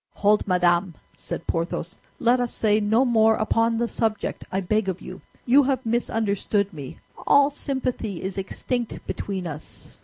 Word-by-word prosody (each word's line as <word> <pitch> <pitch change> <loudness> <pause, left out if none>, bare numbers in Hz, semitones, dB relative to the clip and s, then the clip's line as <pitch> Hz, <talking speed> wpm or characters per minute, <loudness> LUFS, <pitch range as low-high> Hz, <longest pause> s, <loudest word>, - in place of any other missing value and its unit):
"Hold, 210 +1 +2
madame," 175 -1 +2 0.2
said - - -6
Porthos, 165 +1 -3 0.2
"let 250 -2 +3
us 245 -1 -1
say 215 -1 +2
no 220 +5 +3
more 225 -2 +4
upon 230 +1 +1
the 235 +1 0
subject, 220 -2 -2
I 190 - 0
beg 200 +2 0
of 185 0 -3
you. 185 -1 -9 0.2
You 265 +4 +6
have 265 -2 0
misunderstood 210 -3 0
me, 140 -4 -8 0.3
all 285 0 +5
sympathy 255 - -3
is 190 +1 -3
extinct 240 +4 -4
between 190 -3 -4
us." 155 -2 -9
215 Hz, 155 wpm, -24 LUFS, 190-235 Hz, 0.3 s, You